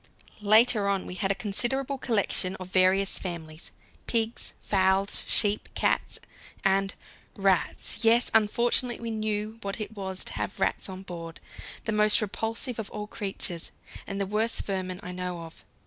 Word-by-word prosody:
Later 215 Hz, 0 st, +5 dB
on 195 Hz, -1 st, 0 dB
we -, -, -6 dB
had 195 Hz, +1 st, 0 dB
a -, -, +1 dB
considerable 250 Hz, +6 st, +1 dB
collection 200 Hz, -6 st, +1 dB
of 185 Hz, -1 st, -8 dB
various 185 Hz, +1 st, +3 dB
families: 165 Hz, -3 st, -6 dB, 0.4 s
pigs, 230 Hz, 0 st, -1 dB
fowls, 190 Hz, 0 st, +2 dB
sheep, 205 Hz, 0 st, +1 dB
cats, -, -, +1 dB, 0.5 s
and 195 Hz, 0 st, +2 dB, 0.4 s
rats. 195 Hz, +3 st, +1 dB
Yes, 230 Hz, +2 st, +4 dB
unfortunately, 235 Hz, +3 st, +2 dB
we 230 Hz, -1 st, -4 dB
knew 215 Hz, 0 st, -2 dB
what 200 Hz, +2 st, -4 dB
it 215 Hz, +1 st, -5 dB
was 190 Hz, -2 st, -1 dB
to -, -, -5 dB
have -, -, -4 dB
rats -, -, +1 dB
on 190 Hz, 0 st, -7 dB
board, 165 Hz, -3 st, -8 dB, 0.5 s
the 225 Hz, -, 0 dB
most 210 Hz, 0 st, +5 dB
repulsive 225 Hz, +3 st, -2 dB
of 215 Hz, -, -4 dB
all 210 Hz, 0 st, -5 dB
creatures, 195 Hz, -5 st, -3 dB, 0.4 s
and 195 Hz, 0 st, -3 dB
the 200 Hz, -, +1 dB
worst 215 Hz, +4 st, 0 dB
vermin 185 Hz, -2 st, -3 dB
I 180 Hz, -, -5 dB
know 180 Hz, -1 st, -4 dB
of. 165 Hz, 0 st, -11 dB
200 Hz, 155 wpm, -28 LUFS, 185-220 Hz, 0.5 s, Later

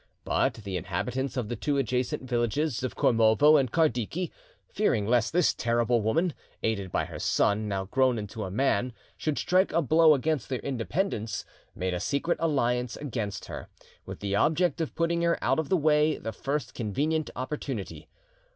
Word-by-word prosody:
But -, -, +1 dB
the 100 Hz, -4 st, -5 dB
inhabitants 125 Hz, +10 st, -3 dB
of 120 Hz, -4 st, -1 dB
the 120 Hz, -, -3 dB
two 145 Hz, +2 st, -1 dB
adjacent 125 Hz, -1 st, -1 dB
villages 125 Hz, +3 st, 0 dB
of 130 Hz, -, -3 dB
Kormovo 115 Hz, +6 st, +5 dB
and 135 Hz, -5 st, +2 dB
Kardiki, 160 Hz, -, 0 dB, 0.4 s
fearing 130 Hz, -, +1 dB
lest 120 Hz, 0 st, +2 dB
this 175 Hz, 0 st, +3 dB
terrible 120 Hz, 0 st, +1 dB
woman, 160 Hz, -, +1 dB, 0.3 s
aided 100 Hz, -5 st, -1 dB
by -, -, 0 dB
her -, -, -8 dB
son, 105 Hz, +1 st, +1 dB
now 95 Hz, -1 st, -2 dB
grown 130 Hz, +3 st, +2 dB
into 105 Hz, +1 st, -5 dB
a 95 Hz, -, -4 dB
man, 125 Hz, +3 st, +1 dB, 0.2 s
should 155 Hz, -2 st, -2 dB
strike 185 Hz, +2 st, +2 dB
a 165 Hz, -, +2 dB
blow 160 Hz, +2 st, +6 dB
against 145 Hz, -1 st, -1 dB
their 130 Hz, -, -1 dB
independence; 130 Hz, -, -2 dB, 0.3 s
made 90 Hz, 0 st, -2 dB
a 90 Hz, -, -2 dB
secret 145 Hz, -, -1 dB
alliance 125 Hz, -6 st, 0 dB
against 110 Hz, -8 st, -4 dB
her, -, -, -8 dB, 0.3 s
with -, -, -9 dB
the 100 Hz, -1 st, -1 dB
object 165 Hz, -, +2 dB
of 160 Hz, -, -3 dB
putting 170 Hz, 0 st, +1 dB
her 170 Hz, 0 st, +2 dB
out -, -, +1 dB
of 160 Hz, -, -2 dB
the 190 Hz, -, +3 dB
way 150 Hz, -1 st, +3 dB
the 110 Hz, -, -5 dB
first 140 Hz, +6 st, -3 dB
convenient 145 Hz, +8 st, -1 dB
opportunity. 130 Hz, -5 st, -5 dB
130 Hz, 170 wpm, -28 LUFS, 110-155 Hz, 0.4 s, blow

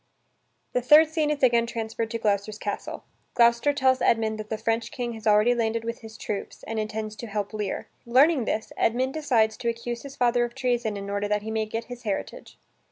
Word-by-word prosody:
The 250 Hz, -, +1 dB
third 300 Hz, +5 st, +7 dB
scene 315 Hz, -2 st, 0 dB
is 295 Hz, -2 st, -2 dB
again 235 Hz, -2 st, +4 dB
transferred 225 Hz, -1 st, -3 dB
to 230 Hz, -, -2 dB
Gloucester's 210 Hz, -1 st, -1 dB
castle. 205 Hz, -1 st, -5 dB, 0.3 s
Gloucester 235 Hz, +3 st, +4 dB
tells 260 Hz, -2 st, +2 dB
Edmund 220 Hz, -1 st, +2 dB
that 215 Hz, 0 st, -7 dB
the 220 Hz, -, -2 dB
French 225 Hz, +1 st, -1 dB
King 240 Hz, -2 st, -3 dB
has 220 Hz, -1 st, -6 dB
already 210 Hz, +3 st, +5 dB
landed 230 Hz, -1 st, -1 dB
with 230 Hz, 0 st, -4 dB
his 220 Hz, -1 st, -11 dB
troops, 200 Hz, -2 st, -5 dB
and 225 Hz, -1 st, -3 dB
intends 215 Hz, 0 st, -4 dB
to 235 Hz, -, -7 dB
help 205 Hz, 0 st, -3 dB
Lear. 210 Hz, -2 st, -3 dB, 0.2 s
Learning 265 Hz, +2 st, +4 dB
this, 220 Hz, -, -2 dB
Edmund 255 Hz, +4 st, +1 dB
decides 235 Hz, -8 st, +2 dB
to 235 Hz, -, -1 dB
accuse 235 Hz, 0 st, -4 dB
his 280 Hz, -1 st, -10 dB
father 245 Hz, -1 st, +2 dB
of 240 Hz, +1 st, -4 dB
treason 240 Hz, -5 st, -1 dB
in 200 Hz, 0 st, -6 dB
order 200 Hz, 0 st, -1 dB
that 210 Hz, 0 st, 0 dB
he 220 Hz, -, -4 dB
may 220 Hz, -1 st, -1 dB
get 225 Hz, +2 st, -3 dB
his 245 Hz, 0 st, -9 dB
heritage. 220 Hz, -, -5 dB
230 Hz, 210 wpm, -26 LUFS, 215-245 Hz, 0.3 s, third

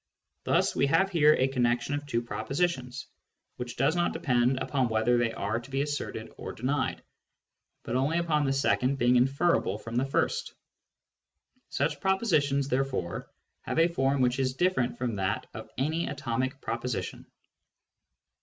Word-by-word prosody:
Thus -, -, +2 dB
we 140 Hz, -, +3 dB
have 180 Hz, +7 st, +3 dB
here 155 Hz, -3 st, +5 dB
a 130 Hz, -, +2 dB
connection 120 Hz, 0 st, 0 dB
of 145 Hz, 0 st, -3 dB
two 120 Hz, -4 st, -1 dB
propositions, 135 Hz, 0 st, -2 dB, 0.5 s
which 125 Hz, 0 st, -5 dB
does 135 Hz, +6 st, +2 dB
not 175 Hz, 0 st, +1 dB
depend 125 Hz, 0 st, +2 dB
upon 130 Hz, -2 st, 0 dB
whether 110 Hz, +2 st, +2 dB
they 120 Hz, -1 st, +1 dB
are 110 Hz, -, -2 dB
to 120 Hz, +3 st, -13 dB
be 135 Hz, +1 st, 0 dB
asserted 145 Hz, -6 st, -4 dB
or -, -, -6 dB
denied, 130 Hz, +4 st, -1 dB, 0.8 s
but 115 Hz, -, -3 dB
only 140 Hz, +6 st, +1 dB
upon 160 Hz, -3 st, +1 dB
the 135 Hz, -, +1 dB
second 135 Hz, -1 st, +2 dB
being 120 Hz, 0 st, +3 dB
inferable 135 Hz, -, +2 dB
from 115 Hz, +1 st, -9 dB
the 130 Hz, -, +2 dB
first. 135 Hz, -, -1 dB, 1.1 s
Such -, -, -1 dB
propositions, 155 Hz, -9 st, +2 dB
there 135 Hz, 0 st, +2 dB
fore, 110 Hz, -11 st, -4 dB, 0.3 s
have -, -, -4 dB
a 165 Hz, +1 st, +5 dB
form 135 Hz, -4 st, +1 dB
which 125 Hz, +1 st, +2 dB
is 130 Hz, -1 st, 0 dB
different 175 Hz, -6 st, +1 dB
from 120 Hz, -4 st, -2 dB
that 95 Hz, +2 st, -1 dB
of 110 Hz, 0 st, -8 dB
any 160 Hz, +5 st, 0 dB
atomic 130 Hz, 0 st, -2 dB
proposition. 120 Hz, +1 st, -4 dB
135 Hz, 155 wpm, -28 LUFS, 120-145 Hz, 1.1 s, here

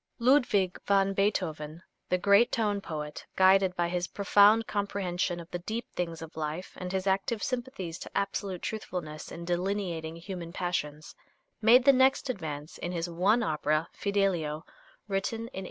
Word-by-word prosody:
Ludwig 235 Hz, -7 st, +3 dB
van 195 Hz, -1 st, +3 dB
Beethoven, 170 Hz, -5 st, -1 dB, 0.3 s
the 180 Hz, -, +3 dB
great 200 Hz, +5 st, +4 dB
tone 205 Hz, -3 st, 0 dB
poet, 150 Hz, -4 st, -6 dB
guided 190 Hz, -1 st, +5 dB
by 175 Hz, -1 st, +1 dB
his 180 Hz, +1 st, -2 dB
profound 205 Hz, +3 st, +5 dB
comprehension 190 Hz, -4 st, -2 dB
of 170 Hz, 0 st, -11 dB
the 175 Hz, -, -3 dB
deep 220 Hz, +6 st, -4 dB
things 165 Hz, -2 st, -3 dB
of 160 Hz, -, -11 dB
life 155 Hz, +3 st, -4 dB
and 180 Hz, 0 st, -5 dB
his 190 Hz, 0 st, -1 dB
active 195 Hz, +3 st, 0 dB
sympathies 240 Hz, -10 st, -4 dB
to -, -, -6 dB
absolute 195 Hz, -2 st, -2 dB
truthfulness 175 Hz, -8 st, -5 dB
in 170 Hz, +1 st, -7 dB
delineating 175 Hz, -2 st, -2 dB
human 170 Hz, 0 st, -7 dB
passions, 155 Hz, -5 st, -3 dB, 0.5 s
made 240 Hz, +3 st, +6 dB
the 275 Hz, -, +8 dB
next 265 Hz, 0 st, +3 dB
advance 155 Hz, -7 st, -7 dB
in 175 Hz, -, -3 dB
his 170 Hz, -1 st, -2 dB
one 195 Hz, +8 st, +2 dB
opera, 155 Hz, -1 st, 0 dB
"Fidelio," 180 Hz, -6 st, 0 dB, 0.4 s
written 200 Hz, +3 st, -2 dB
in -, -, -5 dB
1805. 230 Hz, -4 st, -7 dB
185 Hz, 155 wpm, -29 LUFS, 170-205 Hz, 0.5 s, the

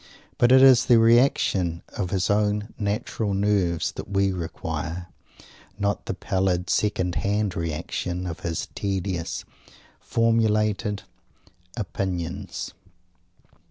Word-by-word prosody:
But 120 Hz, 0 st, +5 dB
it 130 Hz, 0 st, +8 dB
is 130 Hz, -2 st, +7 dB
the 120 Hz, -, +6 dB
reaction 115 Hz, -7 st, +3 dB
of 95 Hz, -3 st, -3 dB
his 95 Hz, 0 st, 0 dB
own 105 Hz, +1 st, 0 dB
natural 105 Hz, 0 st, -1 dB
nerves 95 Hz, -4 st, +1 dB
that -, -, -8 dB
we 100 Hz, -1 st, +2 dB
require, 85 Hz, 0 st, -4 dB, 0.7 s
not 100 Hz, 0 st, -1 dB
the -, -, -2 dB
pallid, 95 Hz, -1 st, 0 dB
second 90 Hz, -4 st, +1 dB
hand 100 Hz, -1 st, 0 dB
reaction 85 Hz, +2 st, -3 dB
of 85 Hz, -1 st, -5 dB
his 85 Hz, -3 st, -3 dB
tedious, 95 Hz, -3 st, -3 dB, 0.5 s
formulated 110 Hz, -2 st, +1 dB, 0.7 s
opinions. 90 Hz, -, -4 dB
100 Hz, 105 wpm, -25 LUFS, 90-105 Hz, 0.7 s, it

